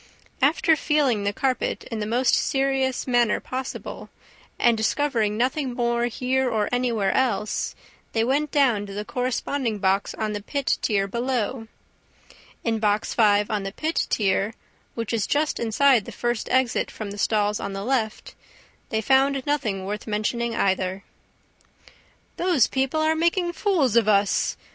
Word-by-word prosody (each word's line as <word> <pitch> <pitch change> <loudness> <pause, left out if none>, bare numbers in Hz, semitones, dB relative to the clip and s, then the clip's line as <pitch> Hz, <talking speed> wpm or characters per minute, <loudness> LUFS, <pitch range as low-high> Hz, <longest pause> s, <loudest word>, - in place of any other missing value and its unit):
After, 315 +3 +4
feeling 280 -9 +1
the 200 - +1
carpet 260 +4 -1
in 225 - -3
the 210 - -3
most 245 +3 +2
serious 270 -1 +1
manner 240 -3 +2
possible, 260 +1 -6 0.5
and 235 -1 +4
discovering 220 -2 0
nothing 255 +1 -1
more 235 -1 +1
here 255 +2 0
or 215 -3 0
anywhere 235 -6 +1
else, 215 -5 0 0.4
they 225 - +2
went 285 +5 +1
down 245 -9 +2
to 200 - -8
the 210 +1 -4
corresponding 250 -1 -2
box 195 0 0
on 215 -1 -2
the 205 - -4
pit 280 +5 -1
tier 200 -3 +1
below. 235 +1 -2 1.0
In 225 -1 0
Box 210 0 0
Five 210 -1 +3
on 210 -2 0
the 195 0 -4
pit 315 +9 -1
tier, 200 +1 +1 0.4
which 230 -1 -3
is 220 -3 0
just 295 +1 0
inside 235 0 +3
the - - -8
first 240 -2 -2
exit 255 -2 +1
from 210 -2 -7
the 205 - -8
stalls 210 0 +1
on 200 - -4
the 195 0 -4
left, 230 -3 -2 0.6
they 220 - 0
found 270 +2 +2
nothing 220 -10 -1
worth 210 +3 -5
mentioning 230 +2 -1
either. 190 -1 0 1.3
"Those 350 -8 +3
people 270 +4 -1
are 310 - +2
all 320 - +2
making 345 +2 +1
fools 335 - +1
of 230 -3 +4
us!" 200 -1 +2
235 Hz, 155 wpm, -24 LUFS, 210-265 Hz, 1.3 s, After